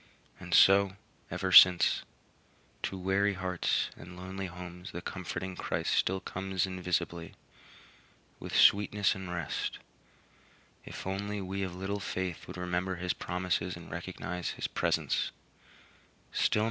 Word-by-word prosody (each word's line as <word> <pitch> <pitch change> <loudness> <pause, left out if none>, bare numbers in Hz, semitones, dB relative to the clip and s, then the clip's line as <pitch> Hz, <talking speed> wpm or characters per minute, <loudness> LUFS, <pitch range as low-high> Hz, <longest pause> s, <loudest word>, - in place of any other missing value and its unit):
And 90 -1 -9
so, 95 -1 +6 0.3
ever 95 +1 -2
since, 90 -1 +8 0.8
to 95 - -3
weary 95 +2 +1
hearts 90 -1 0
and 90 +2 -11
lonely 95 +1 -5
homes 90 0 -9
the 85 - -4
comforting 95 0 -5
Christ - - -1
still 95 +1 +2
comes 95 0 -2
invisibly, 85 -2 -2 1.0
with - - -6
sweetness 100 -1 +5
and 95 -2 -7
rest, 85 -5 -3 1.1
if - - -8
only 100 +2 -3
we 95 +1 -4
of 95 -2 -3
little 95 +2 -3
faith 95 -2 -4
would - - -8
remember 90 +1 -1
his 90 +1 -1
promises 90 0 -2
and 85 0 -11
recognize 90 +1 -4
his - - -2
presence. - - 0
90 Hz, 120 wpm, -31 LUFS, 90-95 Hz, 1.1 s, since